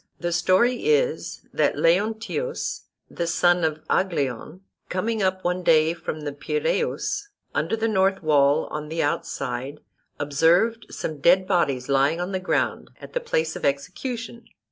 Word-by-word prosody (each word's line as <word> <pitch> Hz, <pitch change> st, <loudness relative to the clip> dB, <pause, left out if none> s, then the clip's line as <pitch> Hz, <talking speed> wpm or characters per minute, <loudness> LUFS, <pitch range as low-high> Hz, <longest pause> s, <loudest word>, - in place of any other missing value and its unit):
The 175 Hz, 0 st, -2 dB
story 215 Hz, +8 st, +2 dB
is, 460 Hz, +1 st, 0 dB
that -, -, +1 dB
Leontius, 220 Hz, -, 0 dB, 0.2 s
the 170 Hz, -, -3 dB
son 175 Hz, +1 st, +3 dB
of 155 Hz, -1 st, -1 dB
Aglaion, 155 Hz, -2 st, -1 dB, 0.3 s
coming 215 Hz, +4 st, -1 dB
up 185 Hz, -1 st, 0 dB
one 180 Hz, +1 st, 0 dB
day 160 Hz, -1 st, +4 dB
from 155 Hz, -2 st, -6 dB
the 145 Hz, -1 st, -4 dB
Piraeus, 430 Hz, -, -1 dB, 0.2 s
under -, -, 0 dB
the 225 Hz, 0 st, 0 dB
north 195 Hz, -3 st, +1 dB
wall 145 Hz, 0 st, +3 dB
on 150 Hz, 0 st, -5 dB
the 165 Hz, +1 st, -1 dB
outside, 135 Hz, -1 st, -3 dB, 0.4 s
observed 170 Hz, +11 st, +2 dB
some 155 Hz, -2 st, -5 dB
dead 185 Hz, +5 st, +5 dB
bodies 140 Hz, -9 st, +1 dB
lying 140 Hz, +4 st, +2 dB
on 180 Hz, +2 st, -3 dB
the 190 Hz, -, -1 dB
ground 185 Hz, -, -1 dB
at -, -, -11 dB
the -, -, 0 dB
place 160 Hz, -, -1 dB
of -, -, -7 dB
execution. 230 Hz, -, -3 dB
175 Hz, 145 wpm, -24 LUFS, 150-220 Hz, 0.4 s, dead